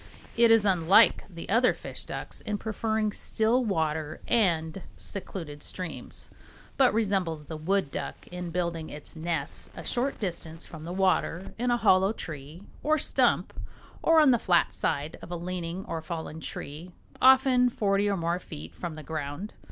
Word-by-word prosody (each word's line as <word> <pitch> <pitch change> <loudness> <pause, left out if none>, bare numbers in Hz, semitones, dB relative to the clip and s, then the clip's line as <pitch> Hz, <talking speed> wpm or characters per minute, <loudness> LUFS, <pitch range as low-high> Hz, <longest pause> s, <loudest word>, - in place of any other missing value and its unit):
It 235 0 +6
is 225 -2 +6
unlike 185 -1 +5
the 170 -3 -8
other 235 +5 +4
"fish - - -7
ducks" - - -4
in 210 -1 -2
preferring 220 0 -1
still 225 +5 +1
water 160 -6 -1
and 175 -5 +2 0.2
secluded 165 -7 -7
streams, 180 +1 -6 0.4
but 265 -2 +5
resembles 190 -8 0
the 160 - -6
wood 170 0 0
duck - - -5
in 180 -1 -5
building 170 -2 -2
its 150 +2 -8
nest 160 -2 -3
a - - -7
short 260 +3 -1
distance 165 -4 -4
from 160 -1 -10
the 170 - -5
water 185 -1 +1
in 245 +1 +1
a 240 - +3
hollow 195 -2 +4
tree 155 0 -8 0.2
or 310 +1 +3
stump - - +2 0.5
or 325 -1 +5
on 300 -4 +7
the 240 - +3
flat 175 -4 +3
side 145 +3 -2
of - - -10
a 175 - -3
leaning 175 +1 -4
or 165 -1 -4
fallen 160 -1 -5
tree, 160 +2 -7 0.3
often 260 -1 +6
forty 205 -3 +1
or 200 - +1
more 170 +1 0
feet 80 - -9
from 170 -3 -5
the 155 - -8
ground. 155 +6 -5
180 Hz, 165 wpm, -28 LUFS, 160-215 Hz, 0.5 s, on